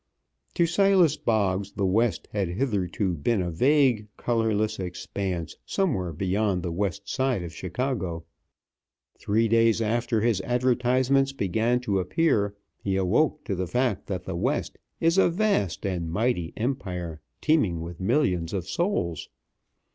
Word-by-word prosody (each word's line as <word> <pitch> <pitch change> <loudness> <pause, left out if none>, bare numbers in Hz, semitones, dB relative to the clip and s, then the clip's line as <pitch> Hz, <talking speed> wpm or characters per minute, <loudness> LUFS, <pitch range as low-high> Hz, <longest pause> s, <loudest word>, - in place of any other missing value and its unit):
To 170 - +4
Silas 180 -3 +4
Boggs 100 -5 0
the 100 - -1
West 110 +4 +1
had 95 -4 -2
theretofore 100 -6 0
been 115 +6 +2
a 90 -2 -1
vague, 125 - +3
colorless 110 -3 0
expanse 90 -1 -4
somewhere 130 - -1
beyond 95 +2 0
the 85 - -2
West 100 +2 -2
Side 130 -8 0
of 85 -1 -7
Chicago. 90 -3 -3 1.0
Three 110 +3 +1
days 115 0 +3
after 115 0 0
his 110 -4 +2
advertisements 125 +3 +2
began 115 +3 0
to 100 -6 0
appear, 100 - +1 0.2
he 95 -1 -1
awoke 115 - +1
to - - -3
the 95 -1 -2
fact 125 +1 0
that 90 -3 -3
the 95 - -5
West 85 - -1 0.2
is 165 +3 +3
a - - +5
vast 175 - 0
and 90 -4 -2
mighty 100 -2 0
empire, 90 - -3 0.2
teeming 110 - +2
with 85 0 -7
millions 95 - +1
of 95 -3 -3
souls. 90 - -1
105 Hz, 140 wpm, -26 LUFS, 90-125 Hz, 1.0 s, a